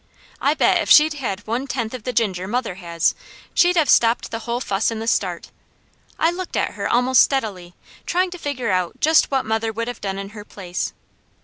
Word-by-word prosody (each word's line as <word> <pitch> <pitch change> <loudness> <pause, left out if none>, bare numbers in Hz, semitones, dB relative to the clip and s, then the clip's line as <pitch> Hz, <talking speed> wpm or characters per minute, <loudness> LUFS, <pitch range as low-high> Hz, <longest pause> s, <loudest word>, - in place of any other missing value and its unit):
I - - +2
bet - - +3
if - - -4
she'd 310 +1 +7
had 220 -9 -4
one 240 +5 -2
tenth 240 -4 -3
of 250 -4 -7
the 250 - -1
ginger 195 -6 -1
mother 240 -1 -2
has, 170 -3 0 0.4
she'd 355 0 +4
have 320 -4 +3
stopped 230 +1 +3
the 225 - -3
whole 235 +2 -3
fuss 200 -4 0
in 225 - -4
the 220 - -5
start. 180 -6 -1 0.7
I 330 - +2
looked 365 +1 -5
at - - 0
her - - -4
almost 250 +1 +4
steadily, 200 -10 -1 0.3
trying 365 +1 +1
to 355 - -8
figure 255 -8 -2
out 185 -2 -1
just 315 +1 +4
what 270 -2 0
mother 220 +1 -1
would 230 +1 -4
have 245 -2 -6
done 195 -1 -3
in 195 0 -6
her 210 0 -10
place. 185 -3 -5
230 Hz, 210 wpm, -21 LUFS, 195-265 Hz, 0.7 s, she'd